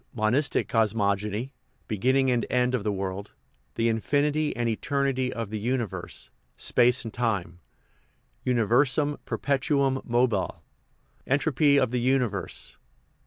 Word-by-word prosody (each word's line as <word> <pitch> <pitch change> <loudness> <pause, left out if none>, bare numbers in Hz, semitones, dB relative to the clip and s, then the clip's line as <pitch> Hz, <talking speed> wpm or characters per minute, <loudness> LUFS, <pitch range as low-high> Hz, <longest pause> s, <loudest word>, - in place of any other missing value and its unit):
Monistic 120 +6 +1
Cosmogony 105 +1 0 0.4
Beginning 130 +5 +2
and 120 -1 +1
End 125 0 +1
of 125 -5 0
the 105 - 0
World 95 +1 -4 0.4
The 115 - +1
Infinity 145 +7 +1
and 120 0 -1
Eternity 130 +2 0
of 115 -3 -5
the 110 - -3
Uni 120 +3 0
verse 100 - -8 0.3
Space 125 +1 +3
and 115 - -7
Time 100 -8 -2 0.8
Universum 130 +5 +2
perpetuum 140 -1 0
mobile 120 -4 0 0.6
En 135 - +3
tropy 145 -1 +3
of 115 - +1
the 125 -1 0
Universe 120 -7 -1
II. - - -44
120 Hz, 125 wpm, -26 LUFS, 110-135 Hz, 0.8 s, Space